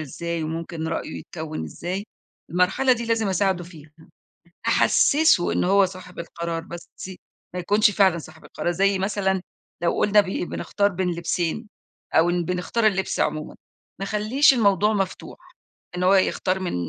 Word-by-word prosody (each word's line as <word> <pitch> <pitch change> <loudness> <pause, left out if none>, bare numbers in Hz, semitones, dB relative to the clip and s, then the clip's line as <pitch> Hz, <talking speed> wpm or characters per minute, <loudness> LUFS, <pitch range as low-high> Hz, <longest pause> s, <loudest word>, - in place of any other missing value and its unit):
إزاي، 170 +3 -4
وممكن 160 0 -4
رأيُه 160 -1 -4
يتكوّن 160 -2 -6
إزاي، 185 +4 -5 0.5
المرحلة 180 +9 +3
دي 235 -1 -2
لازم 225 -3 +1
أساعدُه 190 -1 0
فيها، 160 -4 -14 0.8
أحسِّسُه 290 - +4
إنه - - +1
هو 195 0 +5
صاحب 185 -1 -10
القرار، 170 0 -4
بس 170 +1 -10 0.2
ي 190 -1 -9 0.4
ما 180 - -3
يكونش 205 +4 +3
فعلًا 190 -4 +3
صاحب 160 - -11
القرار 175 - -3
زي 195 +2 +2
مثلًا 190 -1 0 0.4
لو 170 - +3
قُلنا 210 0 +5
بي 190 -2 -3
بنختار 200 +3 -1
بين 185 -1 -2
لبسين، 175 +5 -2 0.5
أو 165 +2 +5
إن 175 -1 0
بنختار 180 +5 0
اللِبس 190 -2 -1
عمومًا 155 0 -1 0.4
ما 195 - -3
اخليش 215 +8 +3
الموضوع 210 -2 +3
مفتوح، 195 -2 -3 0.6
إنه 180 - -1
هو 195 - +6
يختار 190 0 +1
من 185 - -3
185 Hz, 155 wpm, -23 LUFS, 170-200 Hz, 0.8 s, هو